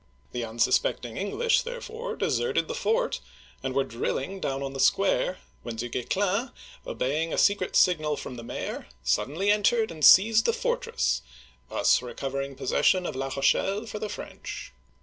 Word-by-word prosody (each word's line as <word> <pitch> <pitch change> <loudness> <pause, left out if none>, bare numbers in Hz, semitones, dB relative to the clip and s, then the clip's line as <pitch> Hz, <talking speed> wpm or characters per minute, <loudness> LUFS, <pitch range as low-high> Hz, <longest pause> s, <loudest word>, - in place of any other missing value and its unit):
The 125 - -3
unsus 115 0 +2
pecting - - -4
English, 475 +1 +1
therefore, 475 -1 -6
deserted 470 - 0
the - - -3
fort, - - 0 0.4
and 130 0 -3
were 135 - +3
drilling 135 +8 -3
down 135 -5 -2
on 135 0 -4
the 135 - -6
square, 190 +1 +2 0.2
when 120 -1 -6
Du 120 +2 -4
Guesclin, 200 - 0 0.4
obeying 155 +5 -1
a - - -2
secret 200 -2 +2
signal 155 -5 +3
from 130 - -7
the 120 - -7
mayor, - - -5 0.2
suddenly 145 - +1
entered 220 +1 +2
and 155 -2 -8
seized 220 +7 +7
the - - +3
fortress, 480 - 0 0.5
thus - - +3
recovering 135 +2 -4
possession 185 +6 +2
of - - -4
La 135 +1 -2
Rochelle 195 - +1
for 215 -2 -6
the 215 - -4
French. - - -7
185 Hz, 160 wpm, -27 LUFS, -, 0.5 s, seized